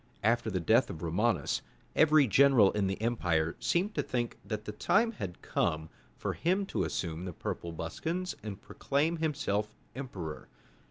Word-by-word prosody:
After 115 +1 +2
the 95 -3 -1
death 110 +9 +4
of 85 -5 -7
Romanus, 105 +8 +1 0.3
every 155 -2 +6
general 125 -3 +6
in 105 -2 0
the 95 - -2
empire 90 -9 +1
seemed 190 +5 +1
to 145 - +1
think 120 -3 -2
that 105 -1 -4
the - - -4
time 225 - +2
had 95 - -7
come 80 0 0 0.3
for - - -2
him 185 +4 +1
to - - -1
assume 85 0 -3
the 90 - -5
purple 85 +2 -4
buskins 165 - -3
and 105 -2 -6
proclaim 150 +5 0
himself 120 -10 -1 0.2
emperor. 95 - -6
110 Hz, 160 wpm, -31 LUFS, 90-145 Hz, 0.3 s, every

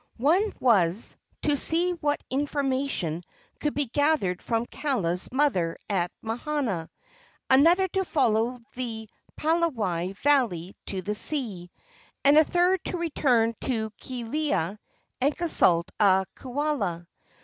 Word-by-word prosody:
One 350 - +3
was, 200 -4 +2 0.3
to 295 -1 +3
see 335 +5 +2
what 295 -4 -1
information 270 - -1 0.4
could 295 - -1
be 290 0 +1
gathered 270 - +1
from 230 0 -1
Kaala's 195 - -1
mother 245 - +1
at 180 -3 0
Mahana, 230 - -2 0.6
another 335 +8 +6
to 385 +2 0
follow 245 - +1
the 225 -3 -5 0.3
Palawai 230 - 0
valley 205 - +1
to 190 -2 -3
the 210 - -2
sea, 210 - -4 0.6
and 285 +1 +7
a 310 - +8
third 355 +3 +2
to 360 - -2
return 255 -9 +2
to 220 -4 -1
Kealia 240 - -2 0.4
and 280 +3 +1
consult 180 - +2
a 190 -2 +4
kaula. 255 - -2
255 Hz, 115 wpm, -26 LUFS, 195-300 Hz, 0.6 s, a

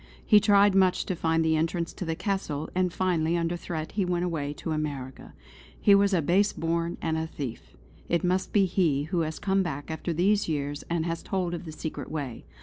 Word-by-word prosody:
He 210 - +7
tried 205 -1 +5
much 190 -1 +3
to 185 - -2
find 165 -1 +1
the 160 0 +3
entrance 165 +2 -1
to 185 - -5
the 165 -1 -1
Castle, 160 -6 -3
and 185 -1 +1
finally 170 -2 +1
under 170 +1 0
threat 160 -2 -5
he 200 - 0
went 180 -1 0
away 150 -5 -2
to 160 - -5
America. 145 -4 -4 0.4
He 205 - +5
was 200 0 +5
a 175 -5 +2
base 195 +7 +3
born 170 +1 -1
and 160 -1 0
a 160 - -2
thief. 120 - -7 0.3
It 170 -1 +1
must 185 +1 0
be 200 -2 +4
he 165 -6 +1
who 175 +3 -1
has 160 -1 -2
come 195 -1 +1
back 150 -5 -4
after 160 +2 -3
these 195 +4 +2
years 145 -1 -2
and 170 -1 0
has 165 -1 -2
told 180 -3 -2
of 175 0 -5
the 160 - -6
secret 155 0 -6
way. 140 -6 -5
170 Hz, 215 wpm, -27 LUFS, 155-185 Hz, 0.4 s, He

